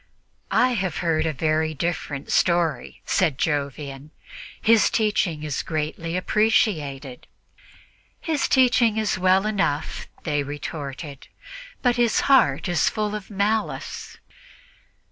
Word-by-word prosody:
"I 255 - +3
have 190 -9 -2
heard 165 -1 +1
a - - +1
very 155 +2 0
different 145 -3 -3
story," 170 -7 +1
said 165 -8 +1
Jovian; 140 -1 -3 0.5
"his 225 -2 +4
teaching 200 -8 0
is 150 -3 -2
greatly 160 +2 -3
appreciated." 155 - 0 0.9
"His 315 -3 -1
teaching 240 -4 +3
is 215 -3 0
well 185 +2 +3
enough," 195 -9 -1 0.2
they 145 -2 0
retorted, 145 0 -7 0.6
"but 245 -1 +2
his 235 -2 +2
heart 225 - +3
is 175 -2 +2
full 210 -1 -2
of 210 -2 -6
malice." 210 +2 -2
170 Hz, 110 wpm, -23 LUFS, 145-215 Hz, 0.9 s, his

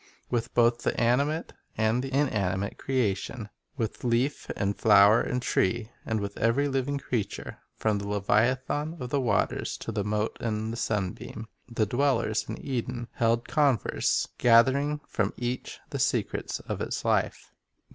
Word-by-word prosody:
With 120 -2 -1
both 120 0 +4
the - - -1
animate 140 +7 +1 0.2
and 110 +3 +2
the 135 0 -5
inanimate 100 -9 0
creation, 110 -3 -1
— - - -43
with 115 -4 -3
leaf 125 +4 0
and 100 0 -1
flower 105 +1 +6
and 125 0 -2
tree, 115 +3 0 0.2
and 110 -1 0
with 100 0 -5
every 120 +6 +2
living 135 +1 -1
creature, 120 -6 -4 0.2
from 105 -2 0
the 100 - -5
leviathan 130 - +1
of 125 0 -5
the 140 - +2
waters 115 -5 0
to - - -5
the 105 -2 -1
mote 105 +1 -1
in 110 -2 -2
the - - -4
sunbeam, 105 0 -3
— - - -30
the 110 - +4
dwellers 120 -2 +1
in - - -5
Eden 125 -2 -3
held 115 0 +1
converse, 140 -8 +2
gathering 135 +5 +4
from 105 -2 -1
each 120 +1 -4
the - - -3
secrets - - -1
of - - -5
its - - -3
life. - - 0
115 Hz, 155 wpm, -28 LUFS, 105-130 Hz, 0.2 s, flower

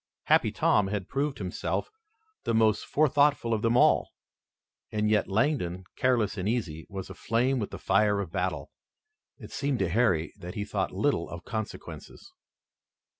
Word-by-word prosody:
Happy - - +3
Tom 105 -2 +2
had 100 -2 -3
proved 140 -1 -1
himself 95 - -3 0.5
the 115 - 0
most 110 -2 +2
forethoughtful 145 -4 +3
of 110 - 0
them 115 +2 +2
all. - - +4 0.8
And 105 0 0
yet 105 - +2
Langdon, 95 - 0
careless 120 -6 +1
and 95 +3 -1
easy, 90 -10 -3
was 95 -2 -6
aflame 125 +4 0
with 105 - -3
the - - -7
fire 105 +1 +2
of 95 -5 -4
battle. - - -2 0.7
It - - -11
seemed 140 -2 -1
to 95 -5 0
Harry 90 -6 +1
that 90 +2 -8
he 105 - -3
thought - - -2
little - - 0
of 85 0 -8
consequences. 110 0 -7
105 Hz, 155 wpm, -28 LUFS, 95-125 Hz, 0.8 s, all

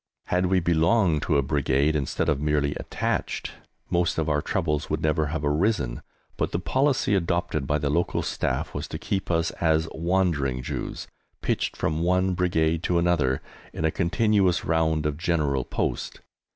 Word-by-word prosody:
Had 90 +1 +1
we 95 0 +3
belonged 85 0 +2
to 75 - +1
a 70 - +2
Brigade 70 +1 +1
instead 70 -3 -1
of 75 - +2
being 75 - -3
merely 75 -1 +1
"attached" - - -3 0.4
most 85 -1 +1
of 80 -1 0
our 75 -1 +1
troubles 80 -3 -1
would 80 - -2
never 75 0 +1
have 75 0 -3
arisen, 75 - 0 0.4
but - - -1
the - - 0
policy 135 +5 +1
adopted 85 -6 0
by 75 - +2
the 70 -1 -1
local 85 +4 0
Staff - - -2
was 75 +1 -4
to - - -5
keep 95 +2 -3
us 85 -1 +1
as 80 -1 +2
"wandering 80 -7 0
Jews," - - -5 0.4
pitched - - -1
from 80 0 -1
one 90 +2 +2
Brigade 85 -3 +1
to 90 - +2
another, 85 -7 +1 0.3
in 80 - -2
a 80 - +2
continuous 95 +1 +2
round 80 -2 +1
of 75 0 -1
General 75 -6 +1
Post. - - -3
80 Hz, 170 wpm, -25 LUFS, 75-90 Hz, 0.4 s, we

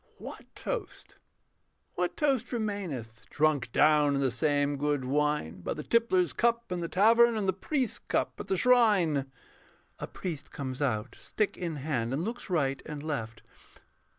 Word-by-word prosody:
What - - -9
toast, - - -5 0.8
what 180 0 -2
toast 265 -6 +1
remaineth, 165 - -4
Drunk 150 -6 +1
down 150 0 +4
in - - 0
the 135 -2 +1
same 145 +3 +1
good 145 -2 0
wine, 145 - 0
By - - -3
the 150 - -6
tippler's 185 -7 +2
cup 235 -3 +1
in 180 - -1
the 170 - -2
tavern, 230 +5 +5
And 205 -2 -1
the 190 - +2
priest's 255 - -2
cup - - -2
at - - -6
the 190 - 0
shrine? 185 - +3 0.7
[_A - - -6
Priest 165 -6 -5
comes 130 -2 -5
out, 110 -7 -1
stick 210 -2 -1
in 170 -3 -4
hand, 130 -5 -2
and 150 +5 -1
looks 235 +2 -5
right 140 -6 0
and 150 -2 -7
left. 115 -7 -4
155 Hz, 160 wpm, -29 LUFS, 140-210 Hz, 0.8 s, tavern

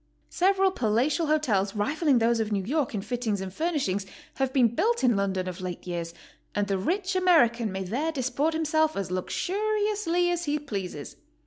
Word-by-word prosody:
Several 385 +1 +3
palatial 255 - +1
hotels 220 -11 +1
rivalling 285 +6 +2
those 235 0 +2
of 220 -1 -1
New 200 -2 0
York 275 +2 -1
in 195 - -3
fittings 220 -2 -2
and 190 -1 -6
furnishings 265 - -1 0.3
have 270 -1 0
been 255 -4 +4
built 465 - +1
in 240 -3 +4
London 190 -2 -1
of 185 +1 -6
late 180 -1 -6
years, 170 -2 -4 0.4
and 205 - +1
the 195 -1 -1
rich 370 - -1
American 240 - +3
may 190 0 -3
there 265 - -1
dis 260 -4 -2
port 305 +5 0
himself 315 0 +1
as 195 -2 -3
luxuriously 395 - 0
as 345 0 -2
he 295 0 0
pleases. 195 - -6
255 Hz, 180 wpm, -27 LUFS, 200-325 Hz, 0.4 s, been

